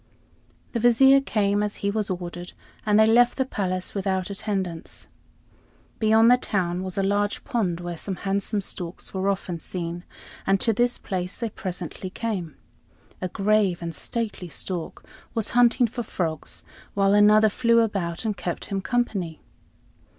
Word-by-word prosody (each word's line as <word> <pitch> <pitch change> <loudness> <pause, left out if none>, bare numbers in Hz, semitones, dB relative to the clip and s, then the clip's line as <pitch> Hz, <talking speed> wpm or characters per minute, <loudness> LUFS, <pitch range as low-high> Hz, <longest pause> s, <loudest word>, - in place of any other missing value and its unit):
The 235 - -1
Vizier 265 +4 +6
came 205 -5 +1
as 210 0 -1
he 200 - +2
was 210 0 -1
ordered, 175 -1 -5 0.3
and 210 0 +5
they 220 - +7
left 240 +2 +4
the 265 - +1
palace 185 -7 -3
without 190 -1 -1
attendants. 190 -5 -4 0.9
Beyond 225 +1 +5
the 250 - +7
town 180 -7 -1
was 185 0 -5
a 195 - +2
large 205 +1 0
pond 185 -8 -1
where 175 0 -4
some 190 +3 -4
handsome 200 +3 -1
storks 180 -2 -6
were 190 +1 0
often 180 -3 -2
seen, 175 0 -5 0.4
and 195 0 +4
to 225 - +2
this 240 +3 +1
place 180 -2 -4
they 230 -2 -3
presently 185 0 -5
came. 185 -6 -4 0.7
A 185 - -1
grave 200 -1 +2
and 170 -1 -4
stately 210 -1 -4
stork 175 +2 -4 0.3
was 225 -2 0
hunting 245 +1 +5
for 240 +2 -4
frogs, 165 -8 -4 0.3
while 195 0 +3
another 210 +1 +6
flew 230 +2 +3
about 195 -5 -2
and 215 -2 0
kept 175 -3 -4
him 195 -1 -3
company. 195 -9 -1
200 Hz, 155 wpm, -25 LUFS, 180-220 Hz, 0.9 s, they